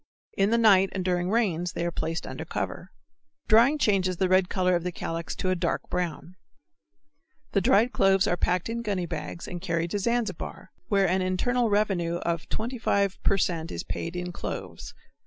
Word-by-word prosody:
In 195 +1 +2
the 230 - +3
night 195 -4 +5
and 185 -2 -3
during 180 -1 0
rains 180 -6 0
they 170 - -2
are 175 - -1
placed 165 0 -3
under - - -6
cover. - - -5 0.6
Drying 235 +7 +5
changes 190 - +1
the 190 - +2
red 185 0 +4
color 185 -1 +2
of 170 - -1
the 180 - -2
calyx 165 -2 -4
to 185 - -1
a - - +2
dark 170 -1 -2
brown. 180 -1 -3 1.2
The 200 - +2
dried 220 +7 +3
cloves 195 0 +4
are 175 - +1
packed 180 0 0
in 230 +1 -3
gunny 200 -5 -2
bags 170 0 -6
and 175 -1 -6
carried 170 -2 -1
to 205 - -1
Zanzibar 235 -1 -2 0.2
where 200 -3 +3
an 185 +2 +1
internal 230 +6 +1
revenue 195 -5 +1
of 170 -1 -3
25 220 -4 -1
per 200 - +2
cent. 165 -3 -1
is 85 - -4
paid 170 +1 -5
in 180 0 -3
cloves. - - -7
185 Hz, 185 wpm, -27 LUFS, 175-205 Hz, 1.2 s, night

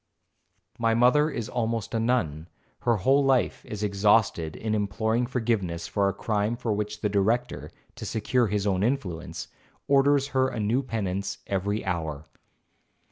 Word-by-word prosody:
My 115 -1 +2
mother 125 +6 +4
is 120 -7 -4
almost 115 -3 -2
a 115 - +1
nun, 90 -10 0 0.3
her 120 - +2
whole 135 +8 +3
life 135 -2 +1
is 105 -1 -6
exhausted 100 -5 +2
in 110 -1 -3
imploring 110 +3 0
forgiveness 110 -9 -1
for 100 -1 +1
a - - -3
crime 105 +1 0
for 115 -2 -1
which 105 +1 -3
the 105 - +1
Director, 110 +5 0 0.3
to - - -6
secure 120 +2 +1
his 105 0 -1
own 95 -2 +1
influence, 105 - -2 0.4
orders 140 0 +4
her 130 -2 +2
a 125 - -4
new 110 +5 +1
penance 100 -6 -3
every 100 +3 -2
hour. 80 -5 -3
110 Hz, 150 wpm, -26 LUFS, 100-125 Hz, 0.4 s, mother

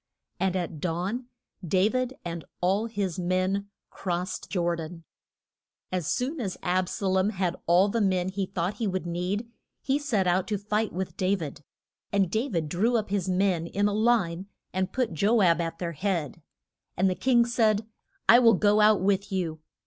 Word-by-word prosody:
And 190 -1 +1
at 170 -4 -3
dawn 185 +9 -2 0.4
Da 185 +3 +3
vid 255 +2 -1
and 170 -2 -4 0.2
all 195 +5 +1
his 200 -6 -3
men 185 +3 0 0.2
crossed 180 0 -3
Jor 175 -3 0
dan. 165 +1 -8 0.9
As 180 -4 -2
soon 275 +5 -1
as 195 -5 -3
Ab 185 0 +1
sa 200 - -4
lom 190 +1 +2
had 185 -4 -1
all 175 +4 +5
the 225 +2 0
men 185 -2 +1
he 190 0 -2
thought 185 +1 -2
he 225 - -1
would 185 -2 -2
need, 180 +6 -2 0.4
he 275 +2 +1
set 235 -10 0
out 180 +1 +2
to 210 - -1
fight 210 +2 -1
with 185 +1 -4
Da 190 +2 +2
vid. 150 -5 -7 0.5
And 195 -3 +2
Da 225 +6 0
vid 165 -6 -1
drew 220 +10 +1
up 215 -3 -3
his 195 -2 0
men 185 -3 +1
in 200 +3 0
line, 205 -4 +1 0.3
and 185 0 -1
put 250 -8 -1
Jo 205 +7 +3
ab 170 -1 +4
at 165 0 -3
their 170 0 -3
head. 170 -2 -2 0.6
And 190 - +3
the 185 - +2
king 240 +3 +3
said, 220 -3 +2 0.4
I 235 - +8
will 230 -3 +6
go 210 +2 +3
out 210 -2 +5
with 200 +1 +1
you. 170 -5 -2
190 Hz, 185 wpm, -27 LUFS, 175-210 Hz, 0.9 s, I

